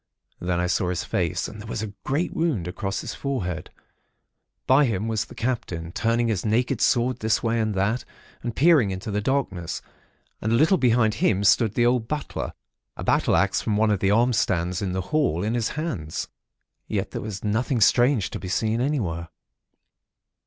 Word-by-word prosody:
Then 90 0 -1
I 90 - +1
saw 90 0 0
his 90 - -2
face, - - -1
and 105 - -9
there 110 - -9
was 110 - -3
a 105 -2 -6
great 145 +6 -1
wound 145 - 0
across 95 +1 -3
his - - -5
forehead. 90 - -3 1.0
By 135 +3 +5
him 110 -3 -1
was 110 -1 -1
the - - -13
Captain, 115 -10 -3
turning 115 +4 +1
his 105 -6 -1
naked 120 +3 +1
sword 125 +1 +2
this 110 0 +1
way 115 0 +1
and 110 -2 0
that, 100 +6 0 0.4
and 120 -2 -4
peering 150 - +5
into 95 +4 -4
the 105 +1 0
darkness; 100 -9 -1 0.6
and 110 - -1
a - - +5
little 160 +8 +4
behind 115 -3 +3
him 100 -2 +1
stood 110 +1 +4
the 120 - +3
old 120 -2 +2
butler, 150 +2 -4 0.4
a - - -5
battle - - +2
axe - - +2
from 105 -2 0
one 110 0 +3
of 100 - +1
the 95 - +2
arm 120 +4 +3
stands 90 -4 0
in 95 -2 -2
the 95 - -1
hall, 130 - +2
in 110 +2 0
his 120 -2 0
hands. 115 - -3 0.6
Yet - - -2
there - - -4
was 105 -3 -6
nothing 115 +4 0
strange 120 -1 +3
to - - -5
be 95 - -7
seen 110 +4 0
anywhere. 95 - -1
110 Hz, 190 wpm, -24 LUFS, 95-125 Hz, 1.0 s, By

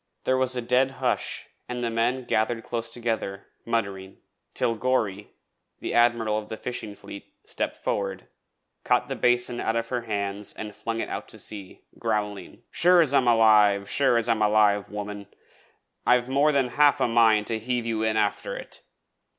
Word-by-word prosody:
There 130 - +2
was 130 -1 0
a 125 - -2
dead 130 +2 +2
hush, - - -1 0.2
and 125 0 -4
the 115 - -1
men 120 +3 0
gathered 115 0 0
close 115 -1 -4
together, 115 -4 -3 0.2
muttering, 100 -5 -3 0.4
till 115 - +1
Gorry, 110 -4 -1 0.5
the - - -4
Admiral 115 -2 +3
of 105 - -11
the 110 - -5
Fishing 110 -4 -6
Fleet, 100 - -11
stepped - - -3
forward, 100 -1 -3 0.6
caught - - +1
the - - -2
basin 120 0 +1
out 110 - -1
of 115 0 -2
her 125 -1 -1
hands 100 -2 -4
and 105 -1 -7
flung 115 0 -3
it - - -4
out - - -5
to - - -10
sea, 100 -3 -8 0.2
growling: 105 -4 -3
'Sure 180 +1 +5
as 155 -5 +3
I'm 130 -3 +3
alive, 105 -3 +5
sure 135 -4 +3
as 115 - 0
I'm 115 -2 +1
alive, 105 -1 +3
woman, 105 -1 -6 0.8
I've 125 0 +3
more 140 +3 +3
than 135 -3 +1
half 145 +2 +4
a - - +2
mind 115 -2 +4
to 110 0 -2
heave 120 +1 -2
you 115 -1 -1
in 110 0 +1
after 105 -1 -1
it. - - -9
115 Hz, 175 wpm, -25 LUFS, 105-125 Hz, 0.8 s, Sure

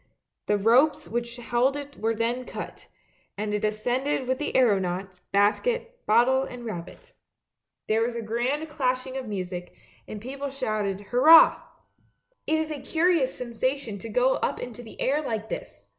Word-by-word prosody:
The 210 - +3
ropes 260 +9 +3
which 235 0 -3
held 245 +3 +1
it 285 0 -8
were 225 +1 -1
then 235 +3 -1
cut, - - -8 0.5
and 210 0 -2
it 210 - -1
ascended 245 +6 0
with 260 0 0
the 295 - -3
aeronaut, 190 -5 +1
basket, 470 - +1
bottle 245 +4 +4
and 250 -2 -7
rabbit. 220 - -8 0.7
There 220 +1 +2
was 235 +1 -1
a 235 - -3
grand 245 +8 -1
clashing 260 -3 -1
of 265 -3 -4
music, 185 -3 -5 0.3
and 215 - -6
the 225 - -10
people 275 +1 -4
shouted 215 -7 -2
"Hurrah! 310 +7 +7 0.3
" - - -41
" - - -47
It 315 - +2
is 315 0 -2
a 290 -3 -5
curious 330 -5 +2
sensation 250 -2 -2
to 225 - -8
go 250 +4 +2
up - - -1
into 245 -1 -7
the 225 - -13
air 290 +3 +1
like 220 -6 -4
this! - - -7
245 Hz, 170 wpm, -26 LUFS, 215-275 Hz, 0.7 s, Hurrah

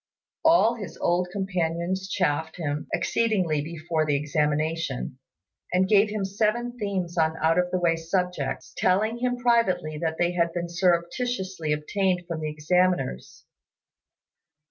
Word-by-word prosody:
All 320 -8 +5
his 200 -8 -8
old 180 +1 +1
companions 185 0 -2
chaffed 160 -4 0
him 150 -3 -3
exceedingly 175 -4 +1
before 160 +1 -2
the 150 -2 +1
examination, 150 -2 -1 0.5
and 185 +1 +3
gave 210 +1 +5
him 210 -2 -2
seven 220 +5 0
themes 185 -5 -2
on 160 0 +2
out 165 +2 +3
of 180 0 +1
the 185 - 0
way 170 -2 +3
subjects, 180 +2 -2
telling 215 +5 +1
him 245 0 0
privately 190 -11 +1
that 160 -1 -2
they 175 0 +2
had 170 -1 0
been 175 -1 -3
surreptitiously 180 0 0
obtained 180 +4 0
from 165 -2 -4
the 155 - -2
examiners. 175 -1 0
175 Hz, 135 wpm, -26 LUFS, 160-195 Hz, 0.5 s, All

